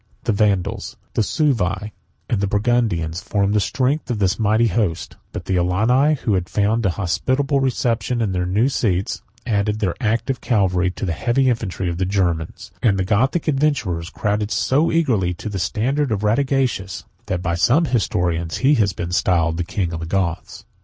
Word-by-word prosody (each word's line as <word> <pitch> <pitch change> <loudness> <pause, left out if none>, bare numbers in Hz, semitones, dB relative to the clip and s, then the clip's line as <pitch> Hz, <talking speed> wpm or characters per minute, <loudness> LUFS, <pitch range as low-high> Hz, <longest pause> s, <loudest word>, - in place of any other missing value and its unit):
The 120 - +1
Vandals, 100 0 0 0.2
the - - +1
Suevi, 105 - 0 0.3
and 105 - 0
the 100 - +1
Burgundians, 105 -7 0
formed 100 -1 0
the 105 - +3
strength 130 - 0
of 120 - -1
this 100 0 +1
mighty 110 +2 +3
host; 100 -5 -1 0.2
but - - -6
the 95 - 0
Alani, 115 - +3
who 115 -6 -1
had 90 -3 -1
found 110 +3 +1
a 85 - -2
hospitable 130 - 0
reception 125 -2 0
in 110 -4 0
their 90 -1 -1
new 105 +7 +2
seats, 100 -8 -1 0.2
added 105 -2 0
their 100 -5 0
active 115 +3 0
cavalry 95 -6 +1
to 95 - -5
the 90 - -1
heavy 125 +9 +1
infantry 100 -5 -3
of 85 0 -3
the 95 - 0
Germans; 90 -5 -1
and 105 -5 +3
the 95 - 0
Gothic 130 - +1
adventurers 135 - 0
crowded 105 0 -1
so 135 +8 +2
eagerly 115 - +1
to 110 - -6
the 100 -2 -4
standard 125 +9 0
of 105 -1 -1
Radagaisus, 120 -5 0 0.2
that 90 -1 -2
by 85 -2 0
some 120 - +3
historians, 85 - 0
he 145 - +6
has 105 -8 +2
been 85 0 -5
styled 85 -2 +1
the 90 - -1
King 85 0 -2
of 80 - -4
the 80 - -5
Goths. 85 -2 -2
105 Hz, 180 wpm, -21 LUFS, 90-120 Hz, 0.3 s, he